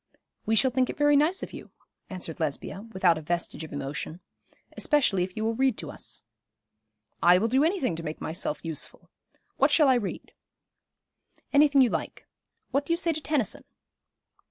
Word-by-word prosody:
'We 225 - +3
shall 260 +4 +4
think 255 0 +1
it - - -5
very 290 0 +4
nice 315 +7 +2
of - - -7
you,' - - -9 0.4
answered 180 -4 -6
Lesbia, 165 +7 -3
without 180 -5 +3
a - - -9
vestige 170 0 -3
of 160 - -9
emotion; 145 +4 -5 0.6
'especially 265 - +2
if 180 +2 -3
you 215 - -1
will 225 - +1
read 260 0 +1
to - - -5
us.' - - -7 1.0
'I 175 +1 +7
will 215 +5 +1
do 260 +5 +3
any 360 +5 +1
thing 255 - 0
to - - -3
make 155 -1 -5
myself 155 -1 -3
useful. 160 -3 -5 0.5
What - - +4
shall 300 -4 +5
I - - +6
read?' 235 -6 -3 1.2
'Anything 285 -1 +6
you 245 - +2
like. - - -4 0.5
What 280 - +1
do 335 - 0
you - - +1
say 335 -1 0
to 310 - -4
Tennyson?' 295 -8 -1
225 Hz, 180 wpm, -27 LUFS, 170-285 Hz, 1.2 s, I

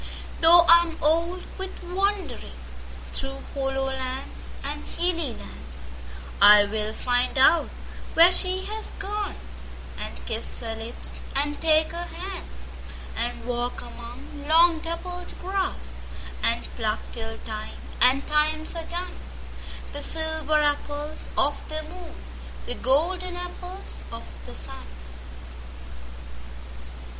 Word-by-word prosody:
Though 340 +1 +9
I 340 0 +10
am 335 -1 -4
old 335 +4 +2 0.2
with 380 0 -5
wanderingThrough 360 -7 -3
hollow 270 -1 0
lands 265 0 -4
and - - -3
hilly 335 -5 -1 1.1
lands,I 205 0 +10
will 215 +1 -2
find 245 +3 0
out 310 +5 +6 0.5
where 335 +2 +9
she 370 +1 +2
has 435 +1 -4
gone, 410 +1 -3 0.6
And - - -6
kiss - - -2
her 225 -1 -3
lips 225 +2 -6 0.2
and 290 +1 0
take 315 -1 +4
her 340 +1 -4
hands; 370 +2 -7 0.5
And 235 0 -2
walk 245 0 -2
among 240 +5 -9
long 330 +1 +6
dappled 355 +2 -5
grass, 380 +1 -2 0.4
And 230 +1 +2
pluck 220 -2 -1
till 225 -1 -5
time 215 -1 -6 0.2
and 260 +3 +6
times 310 +2 +2
are 330 -1 -4
done, 355 +1 -4 0.7
The 290 - -5
silver 315 -1 +1
apples 290 +1 -1
of - - +1
the 310 0 -3
moon, 345 +1 -10 0.5
The - - -3
golden 350 +9 +1
apples 360 +1 -7
of 230 0 -6 0.2
the - - -9
sun. 65 +1 -5
310 Hz, 115 wpm, -26 LUFS, 250-350 Hz, 1.1 s, I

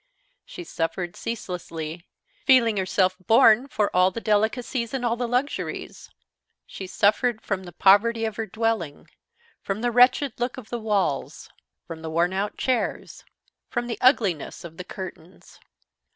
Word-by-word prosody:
She 355 - -9
suffered 175 - -3
ceaselessly, 170 -6 -6 0.4
feeling 235 -5 +4
herself 185 -1 +1
born 230 +1 +6
for 210 -8 -1
all 180 +1 +5
the 230 - -6
delicacies 230 +3 0
and 250 -2 -2
all 235 -1 +1
the 245 0 -2
luxuries. 250 +4 -3 0.6
She 190 - -8
suffered 215 +5 +2
from 190 -2 -3
the 175 - -9
poverty 210 +6 +4
of 220 - -3
her 225 -1 -3
dwelling, 220 -8 -2 0.5
from 195 +2 -3
the 240 0 0
wretched 250 +2 +4
look 245 +2 -2
of 240 -4 -10
the 240 - -2
walls, 210 -3 -2 0.3
from 165 -2 -8
the 160 - -5
worn 170 +3 +1
out 200 +2 -2
chairs, 255 -3 -2 0.5
from 240 0 -2
the 235 -1 -5
ugliness 215 - +2
of 165 -1 -10
the 180 - -6
curtains. 180 -1 -10
215 Hz, 150 wpm, -24 LUFS, 185-240 Hz, 0.6 s, born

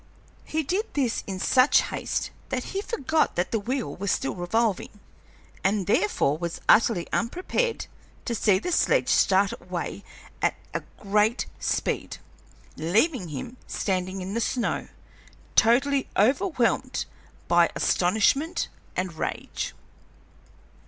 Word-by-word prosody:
He 315 0 -1
did 390 - -1
this 260 -5 0
in 190 -2 -4
such 255 +7 +5
haste - - -3 0.2
that - - -1
he 390 - -1
forgot 320 - 0
that 175 +1 -1
the 225 - +1
wheel 230 - -3
was 200 +1 -1
still 135 - -1
revolving, 210 +3 -1 0.6
and 195 0 +1
therefore 165 -6 +2
was 170 -1 -4
utterly 215 -5 +4
unprepared 370 - -1 0.4
to 240 - -1
see 205 -3 +3
the 290 - -3
sledge - - +3
start 195 0 +4
away 180 +2 -5 0.4
at - - +2 0.2
a - - -1 0.2
great 210 +3 +2
speed, - - -1 0.6
leaving 215 - +1
him 155 - -6
standing 185 -1 -2
on 190 +2 -5
the 230 - 0
snow, 240 +1 -1 0.7
totally 270 +4 +4
overwhelmed 255 - +2 0.4
by - - +5
astonishment 220 - +2 0.3
and 185 -2 -2
rage. 160 - -4
220 Hz, 120 wpm, -26 LUFS, 185-270 Hz, 0.7 s, such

